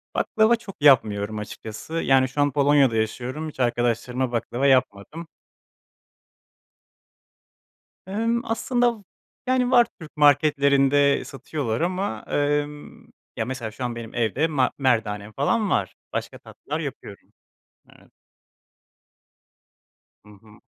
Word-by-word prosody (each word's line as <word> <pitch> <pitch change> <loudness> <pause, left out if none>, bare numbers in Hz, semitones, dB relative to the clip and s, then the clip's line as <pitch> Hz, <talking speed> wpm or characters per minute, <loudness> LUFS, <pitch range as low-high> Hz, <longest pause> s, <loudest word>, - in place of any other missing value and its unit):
baklava 220 +2 +3
çok 210 -4 -11
yapmıyorum 110 -7 +3
açıkçası, 110 +6 -8
yani, 135 -5 +2
şu 145 +3 -2
an 145 0 +2
Polonya'da 140 -3 +3
yaşıyorum, 125 +8 -3
hiç 140 - -15
arkadaşlarıma 120 +1 0
baklava 120 +3 -1
yapmadım. 130 +5 0 2.8
Emm, 230 +4 -1
aslında, 240 +1 0
v - - -20 0.4
yani, 255 0 +1
var, 240 -2 +6
Türk 155 -1 -12
marketlerinde 140 -1 +3
satıyorlar 135 -2 -4
ama, 180 - -2
emm, 145 0 -2 0.3
ya, 110 - -1
mesela 120 -3 -5
şu 125 - -8
an 120 -1 -3
benim 115 0 -8
evde 120 +7 +1
ma 140 -5 +1
merdanem 110 -6 0
falan 205 +9 0
var, - - -1 0.2
başka - - -4
tatlılar - - -7
yapıyorum. - - -8 0.7
Evet. - - -22 2.1
Hı - - -17
hı. 105 -1 -19
140 Hz, 115 wpm, -23 LUFS, 120-160 Hz, 2.8 s, var